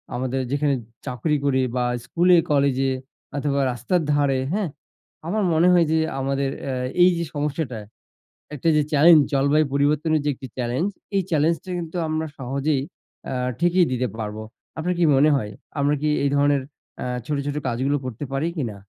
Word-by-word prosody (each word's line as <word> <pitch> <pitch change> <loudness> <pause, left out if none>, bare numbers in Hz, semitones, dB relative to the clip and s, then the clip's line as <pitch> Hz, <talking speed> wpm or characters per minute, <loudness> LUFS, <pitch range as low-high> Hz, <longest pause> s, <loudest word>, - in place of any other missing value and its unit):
আমাদের 130 +1 -1
যেখানে 145 0 +1 0.3
চাকরি 125 +5 -1
করি 130 -2 +2
বা 125 - +1 0.2
স্কুলে 175 +3 +4
কলেজে 135 -2 +2 0.5
অথবা 140 0 0
রাস্তার 125 - 0
ধারে। 140 -2 +2
হ্যাঁ? 205 -4 0 0.6
আমার 210 +3 0
মনে 165 +3 +4
হয় 175 -2 +5
যে। 160 - +3 0.2
আমাদের 135 0 0
অ্যা 135 -2 -2 0.3
এই 180 - +7
যে 170 - -1
সমস্যাটা, 145 -4 -2 0.8
একটা 145 - -3
যে 150 - +4
challenge, 155 +1 +7
জলবায়ু 140 +3 +3
পরিবর্তনের 150 +2 +2
যে - - +2
একটি 130 - -9
challenge, 125 +10 -1 0.2
এই 195 - +3
challenge 160 +2 +2
টা - - -10
কিন্তু 165 +1 -5
আমরা 155 0 -1
সহজেই 135 +2 -1 0.4
অ্যা - - -4 0.2
ঠেকিয়ে 175 +1 +4
দিতে 125 0 0
পারব। 105 -1 -4 0.4
আপনার 180 +3 -1
কি - - +3
মনে 145 +3 +5
হয়? 105 -6 -2 0.3
আমরা 145 +1 +2
কি 150 - +1
এই 140 - +2
ধরনের 145 -1 +3 0.4
অ্যা - - -3 0.2
ছোট, 145 +1 -1
ছোট 145 0 -2
কাজগুলো 130 +5 0
করতে 125 +1 -5
পারি 140 +4 0
কি 150 - 0
না? 100 - -11
145 Hz, 170 wpm, -23 LUFS, 135-160 Hz, 0.8 s, এই